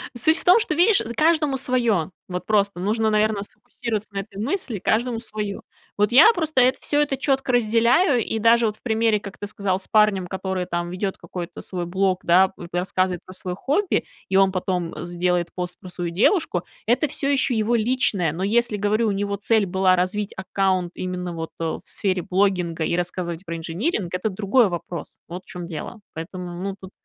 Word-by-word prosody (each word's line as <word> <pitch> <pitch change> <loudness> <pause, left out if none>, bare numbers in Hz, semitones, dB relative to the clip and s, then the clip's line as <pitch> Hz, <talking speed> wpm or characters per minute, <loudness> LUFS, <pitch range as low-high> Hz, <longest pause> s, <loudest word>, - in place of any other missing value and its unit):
суть 315 +7 +4
в - - -5
том, 360 +6 +7
что, 425 -8 -1
видишь, 390 +6 +5
з 230 +1 -4
каждому 305 -1 +2
свое. 235 - +1 0.2
Вот 180 -1 -5
просто 200 -3 +1
нужно, 220 +4 +1
наверно, 215 -1 +1
сфокусироваться 220 0 -5
на 200 - -2
этой 195 0 -8
мысли: 255 - -2
каждому 230 +4 0
свое. 210 -3 -5 0.4
Вот 210 +3 +2
я 315 - +8
просто 315 - +1
это 255 +1 +3
всё, 290 0 +1
это 280 -2 0
четко 270 -1 0
разделяю, 240 - +3
и 225 - -2
даже 230 +1 +4
вот 210 0 -4
в - - -29
примере, 225 -2 +2
как 200 -1 -10
ты 205 - -6
сказал, 200 -3 -1
с 190 - -6
парнем, 210 -4 +3
который 190 0 -3
там 175 0 -3
ведет 190 +1 -3
какой-то 175 -1 -7
свой 180 -2 -5
блог, 190 0 +1
да, 185 +2 +5
п 175 -2 -11
рассказывает 180 0 0
про 185 - -11
свое 180 -1 -4
хобби, 305 - 0 0.2
и 190 - 0
он 195 -1 +5
потом 180 -2 -2
сделает 175 0 0
пост 180 -1 -4
про 185 - -10
свою 175 -1 -4
девушку- 200 - +2 0.2
это 245 +7 +2
всё 275 0 -2
еще 265 -3 +2
его 220 +2 +1
личное. 220 -7 +1
Но 180 +3 -4
если, 225 +1 +1
говорю, 210 +3 +1
у - - +1
него 200 0 -1
цель 220 0 +2
была 185 0 +3
развить 195 +3 -1
аккаунт 190 -1 0
именно 180 -1 -4
вот, 165 -1 -5
э, - - -3 0.2
в - - -15
сфере 190 -2 0
блогинга 180 -4 0
и - - 0
рассказывать 175 -1 -3
про 165 0 -4
инжиниринг- 175 - -2
это 180 +4 -1
другой 205 +3 +2
вопрос, 175 0 -6
вот 180 +2 -7
в - - -35
чём 175 -1 -6
дело. 170 +7 -7
Поэтому, 175 +2 -7
ну, 195 0 -3
тут 190 0 -11
200 Hz, 200 wpm, -23 LUFS, 180-235 Hz, 0.4 s, я